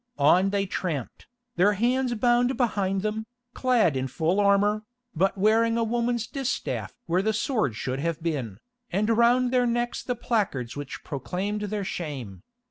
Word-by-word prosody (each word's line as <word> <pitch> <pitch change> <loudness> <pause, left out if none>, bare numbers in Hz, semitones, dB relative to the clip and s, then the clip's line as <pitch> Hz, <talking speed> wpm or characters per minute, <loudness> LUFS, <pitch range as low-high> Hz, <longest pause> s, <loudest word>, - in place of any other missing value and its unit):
On 175 +7 +4
they 200 0 0
tramped, 165 - -4 0.3
their 200 +4 +4
hands 245 +4 +1
bound 245 +3 +2
behind 200 -6 0
them, 220 +1 -2 0.3
clad 240 - +2
in 130 0 -1
full 165 +9 0
armour, 205 +1 +3 0.3
but 190 +5 +1
wearing 225 +3 +3
a 230 - +2
woman's 235 0 0
distaff 270 0 -3
where 180 0 +1
the 220 +2 0
sword 215 - 0
should 130 +3 -3
have 165 +1 -2
been, 135 - -2 0.3
and 210 +5 +1
round 245 +2 +4
their 250 -1 +3
necks 240 0 -1
the 250 - -2
placards 200 - -1
which 145 -2 -7
proclaimed 185 +9 -3
their 210 0 -2
shame. 140 - -5
205 Hz, 155 wpm, -26 LUFS, 165-235 Hz, 0.3 s, On